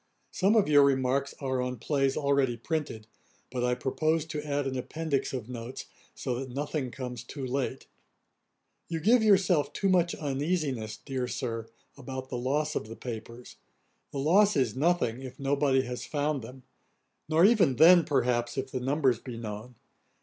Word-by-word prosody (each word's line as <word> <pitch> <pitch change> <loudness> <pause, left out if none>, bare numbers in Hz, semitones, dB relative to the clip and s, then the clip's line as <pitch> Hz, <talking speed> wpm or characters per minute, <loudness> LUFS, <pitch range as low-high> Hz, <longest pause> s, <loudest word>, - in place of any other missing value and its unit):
Some 195 +4 +2
of 215 - +4
your 145 -1 +6
remarks 135 0 +1
are 130 -2 -1
on 125 0 -3
plays 135 +2 0
already 140 -4 +1
printed: 130 -4 -3 0.5
but 125 -1 -2
I 125 0 +2
purpose 155 +5 0
to 155 -2 -4
add 145 -1 -1
an 135 -1 -2
Appendix 145 +2 -2
of 125 -5 -5
Notes, 125 0 -7 0.3
so 125 -1 -3
that 135 0 -6
nothing 140 +1 -3
comes 125 -2 -6
too 135 -2 -6
late. 130 0 -3 1.0
'You 165 -1 -2
give 230 +8 +4
yourself 190 -8 +3
too 195 - 0
much 175 -2 +3
uneasiness, 140 -6 -2
dear 130 0 -4
Sir, 115 -2 -4 0.3
about 130 -1 -7
the - - -4
loss 145 +5 0
of 105 - -3
the 115 - -8
papers. 115 0 -8 0.5
The - - -6
loss 190 +7 +4
is 125 -6 +1
nothing, 140 -5 +1
if 130 -1 -9
nobody 140 -1 +2
has 125 -1 -5
found 145 -1 -1
them; 130 +3 -11 0.7
nor 160 +3 +5
even 205 - +4
then, 170 +5 +7
perhaps, 125 -3 0
if 135 0 -3
the 130 - -2
numbers 130 -2 +1
be 120 -1 -8
known. 110 +2 -7
135 Hz, 165 wpm, -29 LUFS, 125-150 Hz, 1.0 s, then